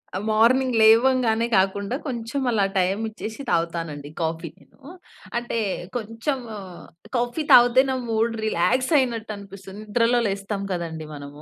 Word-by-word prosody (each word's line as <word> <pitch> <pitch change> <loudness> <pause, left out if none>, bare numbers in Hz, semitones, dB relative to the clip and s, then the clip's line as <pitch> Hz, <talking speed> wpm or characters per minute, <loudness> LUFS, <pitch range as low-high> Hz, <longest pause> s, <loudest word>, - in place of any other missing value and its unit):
ఆ - - 0
మార్నింగ్ 240 +4 +3
లేవంగానే 230 0 +4
కాకుండా 195 +4 +1
కొంచెం 240 +1 -3
అలా 210 -4 +2
టైం 190 +2 +1
ఇచ్చేసి 220 +3 -7
తాగుతానండి 165 -4 -2
కాఫీ 165 0 -2
నేను. - - -24 0.6
అంటే 240 0 -3 0.4
కొంచెము 245 +4 -3 0.7
కాఫీ 245 +5 -1
తాగితే 245 +1 +7
నా 260 - 0
మూడ్ 225 +1 +1
రిలాక్స్ 255 - +1
అయినట్టు 235 -5 -1
అనిపిస్తుంది. 195 0 -11
నిద్రలో 230 +3 +2
లేస్తాం 200 +1 -3
కదండీ! 165 -3 -4
మనము. 145 0 -10
220 Hz, 125 wpm, -23 LUFS, 190-240 Hz, 0.7 s, తాగితే